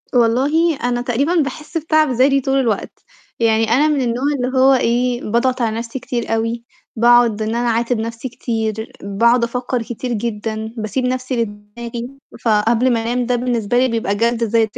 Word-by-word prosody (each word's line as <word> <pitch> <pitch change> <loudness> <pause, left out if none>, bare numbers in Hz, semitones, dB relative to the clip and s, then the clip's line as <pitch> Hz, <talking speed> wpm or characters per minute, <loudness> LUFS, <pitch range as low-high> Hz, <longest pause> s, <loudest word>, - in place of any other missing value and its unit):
والله 275 +8 +3
أنا 245 0 0
تقريبًا 260 +8 0
باحس 305 0 -2
بتعب 310 -1 +2
ذاتي 270 +3 +3
طول 270 +1 0
الوقت، 230 -6 -2 0.4
يعني 225 -1 +2
أنا 280 +6 +4
من 295 -3 +1
النوع 245 +1 -1
اللي 255 +1 -2
هو 265 +1 +6
إيه، 245 0 +1
باضغط 250 +4 0
على 225 -1 0
نَفْسي 230 +3 -5
كتير 240 -2 -3
أوي، 230 +1 -2 0.3
باقعُد 235 -2 +4
إن 220 +1 -1
أنا 240 +1 0
أعاتب 235 0 0
نَفْسي 230 +3 -5
كتير، 225 -2 -3
باقعُد 235 +5 +2
أفكّر 245 +1 -2
كتير 240 +2 -5
جدًا، 220 0 -4
باسيب 220 +4 -2
نَفْسي 255 -1 -1
لدماغي، 230 +3 -6 0.4
فقبل 230 +3 +2
ما 230 - 0
أنام 245 +2 -1
ده 250 +1 +1
بالنسبة 240 -2 -1
لي 255 +1 +4
بيبقى 225 -4 -1
جَلد 230 +2 +1
ذات، 225 -1 +1
235 Hz, 170 wpm, -18 LUFS, 225-255 Hz, 0.4 s, هو